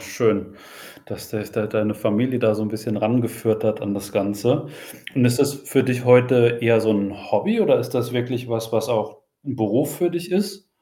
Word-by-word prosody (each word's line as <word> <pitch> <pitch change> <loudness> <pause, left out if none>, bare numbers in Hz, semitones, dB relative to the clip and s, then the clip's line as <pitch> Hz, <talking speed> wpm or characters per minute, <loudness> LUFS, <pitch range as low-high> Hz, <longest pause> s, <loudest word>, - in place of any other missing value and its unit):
schön, - - -1 0.5
dass - - -10
dich 105 -1 -5
da 110 -2 -2
deine 105 0 -1
Familie 110 +4 0
da 110 -3 +3
so 110 - -4
'n 105 - -2
bisschen 110 +1 -5
ran 110 +4 +2
geführt 115 -1 -2
hat 110 0 0
an 100 -1 -3
das 100 0 -6
Ganze. 100 0 0 0.5
Und 125 - +4
ist 120 +1 +3
das 140 0 +3
für 135 -1 0
dich 125 -1 -1
heute 125 -1 +5
eher 115 -1 +4
so 110 - +1
'n 100 -1 -1 0.2
Hobby 220 +3 +1
oder 210 - +4
ist - - -5
das 120 -2 -2
wirklich 125 0 -3
was, 115 -1 -3
was 110 -1 0
auch 110 +6 -2 0.2
'n 135 -2 -6
Beruf 120 +7 0
für 175 -1 +1
dich 175 +1 -5
ist? 195 +1 -2
120 Hz, 210 wpm, -21 LUFS, 110-130 Hz, 0.5 s, heute